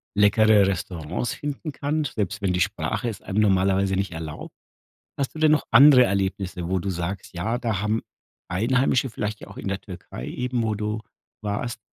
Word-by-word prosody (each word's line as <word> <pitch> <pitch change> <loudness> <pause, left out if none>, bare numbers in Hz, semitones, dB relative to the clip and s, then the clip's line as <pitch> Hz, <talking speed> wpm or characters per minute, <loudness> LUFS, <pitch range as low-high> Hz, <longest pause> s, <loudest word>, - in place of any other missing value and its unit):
leckere 105 0 +5
Restaurants 90 +3 -3
finden 145 +2 -5
kann, 150 +3 -1
selbst 105 -5 -3
wenn 95 -3 +1
die 90 - 0
Sprache 105 +4 -1
es 105 - -7
einem 100 +3 0
normalerweise 95 -1 +3
nicht 95 -1 -1
erlaubt. 80 -2 -7 0.7
Hast 140 +1 -2
du - - -8
denn 155 -1 +4
noch 155 - +2
andere 130 +1 +9
Erlebnisse, 95 -3 -2
wo 95 0 +1
du 95 +2 -3
sagst: 90 +2 -4
Ja, 110 +8 -1
da 110 -6 -1
haben 105 +2 0 0.5
Einheimische, 125 +6 +1
vielleicht 105 -1 -4
ja - - -10
auch - - -12
in - - -7
der 95 0 -2
Türkei 90 -9 -9
eben, 125 -1 -2
wo 110 -1 0
du 105 +1 -2 0.4
warst, 110 +3 -3
105 Hz, 180 wpm, -24 LUFS, 95-120 Hz, 0.7 s, andere